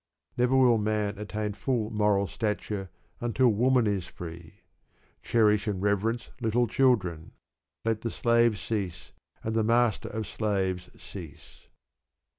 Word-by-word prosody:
Never 125 +2 +2
will 125 -3 +5
man 105 -1 -1
attain 105 0 -3
full 115 -1 -1
moral 105 -2 +2
stature 105 -2 -3 0.3
until 120 +1 +2
woman 125 +3 +3
is 100 -4 -1
free. 85 -1 -10 0.6
Cherish 105 -2 +2
and 100 -3 -1
reverence 105 +4 0
little 120 +1 +2
children. 100 -11 +1 0.5
Let 115 -1 0
the 115 - -2
slave 115 -2 +3
cease, 95 -5 -4 0.3
and 110 - -2
the 110 -1 +2
master 115 0 +2
of 110 0 -4
slaves 95 -4 -2
cease. - - -11
110 Hz, 125 wpm, -28 LUFS, 100-115 Hz, 0.6 s, will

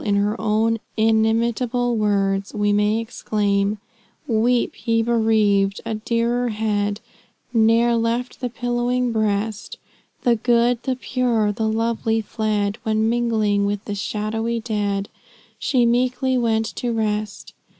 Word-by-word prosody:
In 205 -1 +1
her 205 +1 +1
own 220 +1 +1 0.2
inimitable 230 +2 +1
words, 200 -2 0
we 205 0 +1
may 210 +1 +2
exclaim: 210 -2 -1 0.5
"Weep, 240 -1 0
ye 230 0 +3
bereaved! 215 -4 +2
a 225 - -2
dearer 235 +2 0
head 210 -1 -1 0.5
Ne'er 230 +1 +4
left 230 +2 -1
the 250 - -1
pillowing 245 +1 -1
breast; 215 -1 -2 0.5
The 240 -1 +3
good, 240 +1 +2
the 260 0 -1
pure, 245 -4 0
the 220 +1 -1
lovely 225 0 0
fled, 215 -1 -2
When 220 -1 +1
mingling 220 -4 +1
with 205 +1 -3
the 205 - -4
shadowy 225 +3 -2
dead 205 -3 -2 0.5
She 250 -4 +2
meekly 255 +2 +1
went 225 -2 +1
to 245 - -1
rest. 215 -2 -3
225 Hz, 125 wpm, -21 LUFS, 210-235 Hz, 0.5 s, Ne'er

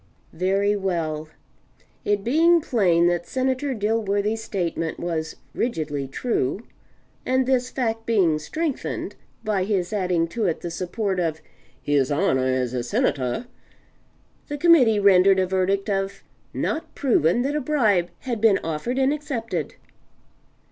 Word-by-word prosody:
Very 195 +4 +1
well. 165 -6 -2 0.7
It 205 -1 0
being 330 +8 +4
plain 185 - +2
that 175 0 +1
Senator 260 +1 -1
Dilworthy's 210 0 0
statement 170 -5 -3
was 160 -2 -3 0.2
rigidly 150 - -2
true, 190 - -2 0.6
and 260 0 +1
this 255 -1 +1
fact 225 -4 -2
being 180 -9 +3
strengthened 310 - -3 0.3
by 210 -4 0
his 190 -2 -1
adding 180 -4 +1
to 225 +3 -2
it 165 - -2
the 170 - -5
support 185 +2 -2
of 160 -3 -1 0.4
"his 140 0 +1
honor 145 -5 +2
as 130 -1 0
a 125 - -1
Senator," 130 - -1 1.0
the 290 - -4
Committee 280 -9 +5
rendered 195 -1 +5
a 190 - +3
verdict 190 +2 0
of 195 -1 -2 0.3
"Not 320 - -3
proven 240 - +2
that 285 +2 -1
a 300 - 0
bribe 215 - +2
had 240 -5 -3
been 220 -3 +5
offered 165 +11 -3
and 270 +1 +3
accepted." 275 -7 -4
195 Hz, 135 wpm, -23 LUFS, 170-240 Hz, 1.0 s, Committee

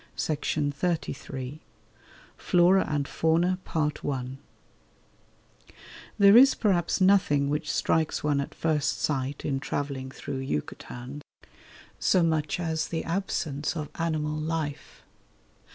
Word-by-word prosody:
CHAPTER 150 -1 -1
XXII 140 -4 -3 0.8
FLORA 180 +2 +4
AND 145 -2 -1
FAUNA 170 +3 +1 2.6
There 200 0 +7
is 265 +3 +8
perhaps 185 -6 +1
nothing 185 -8 +3
which 150 0 -1
strikes 160 -1 0
one 145 -2 +2
at 140 - -7
first 155 -3 0
sight 140 -1 -2
in 135 -2 0
travelling 140 -2 -3
through 135 +1 -6
Yucatan 130 - -5 0.8
so 185 - +3
much 160 -1 0
as 160 -2 -1
the 165 - -3
absence 165 -5 -2
of 150 -2 -4
animal 155 -2 -1
life. 155 -2 -4
155 Hz, 105 wpm, -27 LUFS, 140-170 Hz, 2.6 s, is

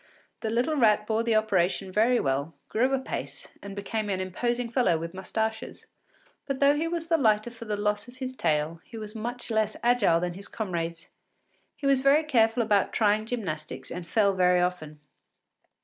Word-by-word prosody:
The 220 - -3
little 245 +7 +1
rat 215 -6 +4
bore 220 +1 +1
the 230 -1 +1
operation 195 -3 +1
very 230 +5 +3
well, 140 +3 -1
grew 255 +4 +1
apace, 265 -1 -4
and 200 -1 -8
became 210 +1 -3
an 190 -2 -1
imposing 240 +6 -1
fellow 235 -10 +3
with 165 +2 -6
mustaches. 220 +4 -4 0.6
But 275 -2 -2
though 280 0 +5
he 320 +3 -1
was 335 -1 -3
the 330 -1 +2
lighter 215 -2 +2
for 230 -1 -10
the 210 -1 -2
loss 210 +2 -1
of 245 - -13
his 260 0 -5
tail, 160 -3 0
he 230 - -11
was 215 -1 -7
much 240 +2 -5
less 220 -1 +1
agile 230 -9 +4
than 175 0 -2
his 195 +3 -9
comrades; 170 -6 -4 0.7
he 285 - -8
was 275 -1 +4
very 280 +3 +5
careful 235 -5 +3
about 205 -3 +2
trying 215 0 +2
gymnastics 170 -11 -4
and 175 0 -6
fell 200 +1 +3
very 180 -1 +3
often. 175 -4 -2
215 Hz, 180 wpm, -27 LUFS, 185-245 Hz, 0.7 s, though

